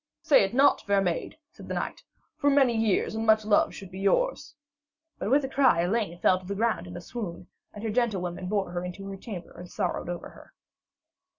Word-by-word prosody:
'Say 285 Hz, -, +6 dB
it 195 Hz, -, -1 dB
not, 275 Hz, +2 st, +5 dB
fair 200 Hz, -1 st, +2 dB
maid,' 180 Hz, -, -2 dB
said -, -, -13 dB
the -, -, -3 dB
knight, -, -, -4 dB, 0.3 s
'for 285 Hz, -, +2 dB
many 270 Hz, -4 st, +4 dB
years 220 Hz, -3 st, +1 dB
and 220 Hz, 0 st, -2 dB
much 220 Hz, -1 st, +4 dB
love 210 Hz, -1 st, +3 dB
should 195 Hz, -1 st, -10 dB
be 190 Hz, -, -8 dB
yours.' 295 Hz, -, 0 dB, 0.6 s
But -, -, -2 dB
with 275 Hz, +2 st, +3 dB
a -, -, -3 dB
cry 260 Hz, -10 st, +3 dB
Elaine 185 Hz, -1 st, -1 dB
fell 185 Hz, +1 st, +3 dB
to 185 Hz, -, -15 dB
the 200 Hz, -, -3 dB
ground 210 Hz, -5 st, 0 dB
in 175 Hz, 0 st, -8 dB
a -, -, -7 dB
swoon, 180 Hz, -3 st, -6 dB, 0.3 s
and 210 Hz, -, -10 dB
her 220 Hz, -, -1 dB
gentlewomen 185 Hz, -7 st, -1 dB
bore 200 Hz, -3 st, -1 dB
her 175 Hz, 0 st, -3 dB
into 180 Hz, +2 st, -7 dB
her 195 Hz, -, -5 dB
chamber 190 Hz, -3 st, -8 dB
and 175 Hz, +1 st, -10 dB
sorrowed -, -, -2 dB
over 175 Hz, -1 st, -5 dB
her. -, -, -17 dB
200 Hz, 215 wpm, -27 LUFS, 180-235 Hz, 0.6 s, Say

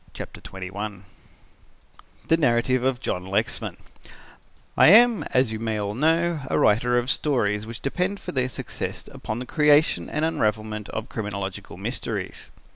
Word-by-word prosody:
CHAPTER -, -, -8 dB
XXI 95 Hz, +1 st, -6 dB, 1.2 s
THE 165 Hz, -, +5 dB
NARRATIVE 130 Hz, -4 st, +2 dB
OF 130 Hz, -1 st, +1 dB
JOHN 90 Hz, -, -2 dB
LEXMAN 95 Hz, -, -2 dB, 1.0 s
"I -, -, +7 dB
am, 230 Hz, +4 st, +7 dB
as 130 Hz, -3 st, +1 dB
you 110 Hz, -, -4 dB
may 110 Hz, -1 st, -2 dB
all 100 Hz, 0 st, -2 dB
know, 165 Hz, +5 st, +2 dB
a -, -, +1 dB
writer 120 Hz, +4 st, +3 dB
of 120 Hz, +2 st, +1 dB
stories 110 Hz, -7 st, 0 dB
which 115 Hz, +1 st, -8 dB
depend 180 Hz, +8 st, -1 dB
for -, -, -6 dB
their 130 Hz, -2 st, 0 dB
success -, -, -5 dB
upon 110 Hz, -, -5 dB
the 125 Hz, -, -5 dB
creation 150 Hz, -, +3 dB
and 155 Hz, -, 0 dB
unravelment 110 Hz, -7 st, -1 dB
of 110 Hz, +1 st, -4 dB
criminological 100 Hz, -3 st, -5 dB
mysteries. -, -, -5 dB
120 Hz, 145 wpm, -24 LUFS, 105-150 Hz, 1.2 s, I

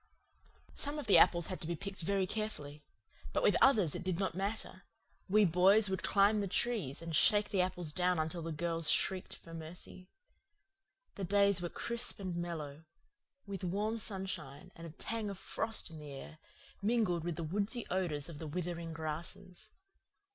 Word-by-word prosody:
Some 290 Hz, +1 st, -3 dB
of 295 Hz, -, -4 dB
the 205 Hz, -, +7 dB
apples 170 Hz, -2 st, +5 dB
had 185 Hz, -, -5 dB
to 155 Hz, -, -3 dB
be 170 Hz, -, -1 dB
picked 195 Hz, +2 st, -6 dB
very 195 Hz, +3 st, +1 dB
carefully. 165 Hz, -9 st, -4 dB, 0.5 s
But -, -, +1 dB
with -, -, +5 dB
others 210 Hz, -, +5 dB
it -, -, -4 dB
did 185 Hz, -2 st, -1 dB
not 190 Hz, -2 st, -1 dB
matter; 195 Hz, 0 st, -4 dB, 0.5 s
we 210 Hz, +2 st, +5 dB
boys 190 Hz, +4 st, +6 dB
would 190 Hz, -, -1 dB
climb 205 Hz, +1 st, +4 dB
the 200 Hz, -, -1 dB
trees 185 Hz, -, -1 dB
and 165 Hz, -1 st, -3 dB
shake 210 Hz, +6 st, +5 dB
the 195 Hz, -, +2 dB
apples 180 Hz, -3 st, -1 dB
down 180 Hz, +2 st, +1 dB
until 160 Hz, +2 st, -2 dB
the 165 Hz, 0 st, -4 dB
girls 165 Hz, 0 st, 0 dB
shrieked 190 Hz, -1 st, +1 dB
for 165 Hz, -, -13 dB
mercy. 170 Hz, +3 st, -9 dB, 1.0 s
The 200 Hz, -, -6 dB
days 200 Hz, 0 st, +3 dB
were 175 Hz, -, -2 dB
crisp 235 Hz, +4 st, -2 dB
and 185 Hz, -3 st, -4 dB
mellow, 160 Hz, -3 st, -5 dB, 0.6 s
with 200 Hz, -1 st, -6 dB
warm 210 Hz, +5 st, -1 dB
sunshine 190 Hz, -9 st, -2 dB
and 165 Hz, 0 st, -8 dB
a 160 Hz, -, -13 dB
tang 225 Hz, -2 st, -3 dB
of 200 Hz, -, -6 dB
frost 220 Hz, -1 st, -2 dB
in 160 Hz, -, -9 dB
the 150 Hz, -1 st, -9 dB
air, 140 Hz, +3 st, -9 dB, 0.4 s
mingled 205 Hz, -6 st, +1 dB
with 170 Hz, -1 st, -2 dB
the 165 Hz, -, -4 dB
woodsy 205 Hz, +8 st, -1 dB
odours 170 Hz, -6 st, 0 dB
of 160 Hz, -4 st, -9 dB
the 160 Hz, -, -5 dB
withering 170 Hz, 0 st, -4 dB
grasses. 165 Hz, +3 st, -6 dB
180 Hz, 175 wpm, -34 LUFS, 165-200 Hz, 1.0 s, the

